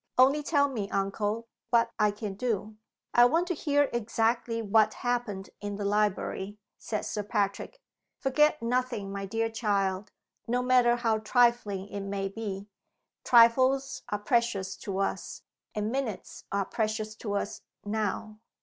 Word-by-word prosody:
"Only 270 +4 +5
tell 285 -1 +2
me, 220 -8 -4
uncle, 205 +3 -1 0.2
what 230 -1 +3
I 210 0 +4
can 205 -1 -5
do!" 215 -1 -2 0.4
"I 240 - +7
want 330 +8 +3
to - - +2
hear 290 -2 +2
exactly 230 0 0
what 215 0 +3
happened 235 -6 -2
in 205 0 -4
the 205 0 -4
library," 205 -1 0 0.2
said 215 - -3
Sir 210 - -2
Patrick. 205 - -2 0.4
"Forget 300 +1 +2
nothing, 240 -4 -1
my 195 0 -4
dear 225 +3 0
child, 200 -4 -1 0.4
no 245 +2 +1
matter 250 -1 +4
how 225 -2 +1
trifling 215 -4 +2
it 200 - -5
may 195 0 -3
be. 200 -2 -5 0.6
Trifles 255 +3 +4
are 205 - 0
precious 205 -3 0
to 195 -2 -5
us, 195 - -3 0.3
and 210 +1 -1
minutes 255 -6 -4
are 200 -1 0
precious 215 0 -2
to 205 -3 -3
us, 200 +1 -3 0.2
now." 215 0 -2
220 Hz, 145 wpm, -29 LUFS, 200-245 Hz, 0.6 s, I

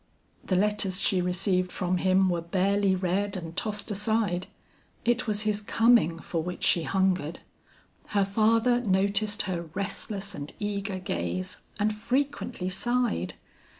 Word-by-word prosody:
The 185 - 0
letters 195 -1 +2
she 185 -2 +2
received 180 0 0
from 185 0 -1
him 190 +1 +3
were 175 -2 0
barely 195 +3 +1
read 190 +2 -1
and 165 -2 -7
tossed 210 +1 -2
aside; 205 -3 0 0.6
it 240 +1 +1
was 210 0 +1
his 210 -1 0
coming 225 -5 +3
for 165 0 -3
which 180 +2 -5
she 170 - +4
hungered. 180 -3 0 0.7
Her 200 -1 +2
father 225 +4 +3
noticed 200 +1 +2
her 175 -4 -4
restless 200 0 -3
and 145 0 -6
eager 200 -2 -3
gaze, 90 - -3 0.2
and 215 +1 +1
frequently 250 -3 -2
sighed. 240 +6 -1
195 Hz, 135 wpm, -27 LUFS, 180-210 Hz, 0.7 s, she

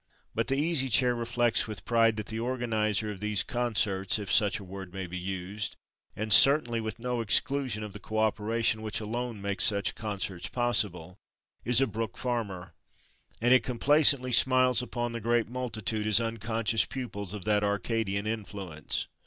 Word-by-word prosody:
But 115 - -1
the 135 - 0
Easy 145 -3 0
Chair 125 +1 +4
reflects 120 -1 +1
with 110 -2 -7
pride 115 -2 +3
that 105 -1 -5
the 110 0 -5
organizer 110 -4 -1
of 100 - -8
these 105 -2 0
concerts, 105 -6 0
if 105 -3 -5
such 105 -1 +3
a 100 - -9
word 95 -1 -9
may 95 0 -5
be 90 0 -8
used, 95 +2 -4 0.4
and 110 0 0
certainly 125 -2 +6
with 110 -2 -5
no 120 0 -2
exclusion 125 0 0
of 105 -2 -7
the 105 - -8
co 110 +1 -6
operation 110 +1 +1
which 110 -1 -2
alone 115 -1 -5
makes 100 0 -1
such 100 -3 +2
concerts 95 -5 -4
possible, 105 -7 -1 0.4
is 125 +1 +3
a - - +4
Brook 110 -3 -5
Farmer; 100 -8 -4 0.7
and 120 +1 +5
it 130 - +6
complacently 130 +1 +3
smiles 130 0 +4
upon 120 -1 -3
the 115 0 -5
great 120 +1 +1
multitude 110 -3 -3
as 105 0 +6
unconscious 115 0 0
pupils 105 -7 -6
of 105 - -8
that 105 -1 +2
Arcadian 100 0 -1
influence. 100 -8 -4
110 Hz, 170 wpm, -28 LUFS, 100-120 Hz, 0.7 s, certainly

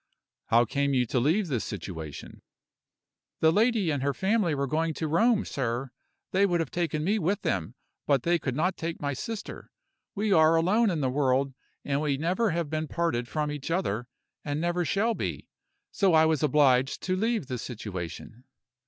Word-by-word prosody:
"How 120 +1 +4
came 140 +3 0
you 125 -1 +3
to 125 - 0
leave 170 - +2
this 125 -7 -1
situation?" 80 -6 -7 1.0
"The 160 - +5
lady 215 -2 +2
and 145 -3 -1
her 140 0 0
family 190 -5 +1
were 140 0 0
going 160 +3 -1
to 160 - -2
Rome, 215 +7 +3
sir. 125 0 -3 0.4
They 195 +1 +3
would 175 -2 +1
have 165 -4 -2
taken 160 -3 -1
me 205 +6 +1
with 195 +4 -1
them, 90 -5 -2 0.3
but 140 -4 +2
they 170 0 +2
could 130 -4 -3
not 175 +5 +1
take 165 0 -4
my 145 -1 -2
sister. 225 - -6 0.5
We 210 0 +1
are 160 -1 +5
alone 205 +8 +3
in 165 -5 -1
the 130 -2 0
world, 135 0 +1 0.3
and 140 0 0
we 145 -3 0
never 185 +9 +1
have 170 -2 -1
been 155 +1 -3
parted 165 -9 -1
from 150 +2 -2
each 145 0 -6
other, 125 - -1 0.4
and 145 0 -2
never 175 +1 0
shall 220 +7 +1
be - - -4 0.4
so 190 -5 +3
I 160 0 +6
was 160 -2 +1
obliged 135 -3 +3
to 185 - 0
leave 220 - 0
the 125 -2 -4
situation." 110 +1 -7
155 Hz, 185 wpm, -27 LUFS, 135-180 Hz, 1.0 s, I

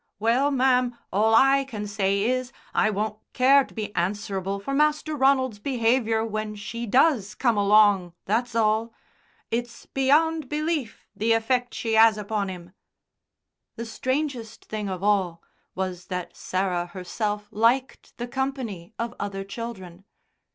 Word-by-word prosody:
"Well, 235 +7 +2
ma'am, 255 -3 +2 0.2
all 220 +3 +4
I 270 +3 +5
can 215 -6 -6
say 200 -1 0
is, 255 +2 -1 0.2
I 215 - +3
won't 215 +1 -2
care 270 +2 +5
to - - -15
be 210 -2 -5
answerable 195 +1 -2
for 240 +8 -4
Master 300 +1 +1
Ronald's 265 -5 +2
behaviour 230 -2 +1
when 215 -1 -4
she 230 +3 -6
does 235 -4 +3
come 235 -2 +2
along, 205 -3 +4
that's 230 +3 -1
all. 225 +1 +1 0.6
It's 235 +1 -3
beyond 300 +2 +2
belief 300 -5 -2
the 225 +2 +2
effect 245 +2 0
she 225 -1 -1
'as 220 -1 +6
upon 210 -1 -2
'im." 180 -1 -9 1.0
The 230 - -5
strangest 255 0 -3
thing 210 -2 -4
of 185 0 -5
all 190 -5 +1 0.3
was 185 -1 -4
that 180 -2 -5
Sarah 185 -2 -1
herself 205 +4 -4
liked 240 +5 0
the 240 - -4
company 240 -8 -4
of 235 +1 -3
other 195 -1 -4
children. 195 -4 -8
225 Hz, 140 wpm, -25 LUFS, 200-255 Hz, 1.0 s, as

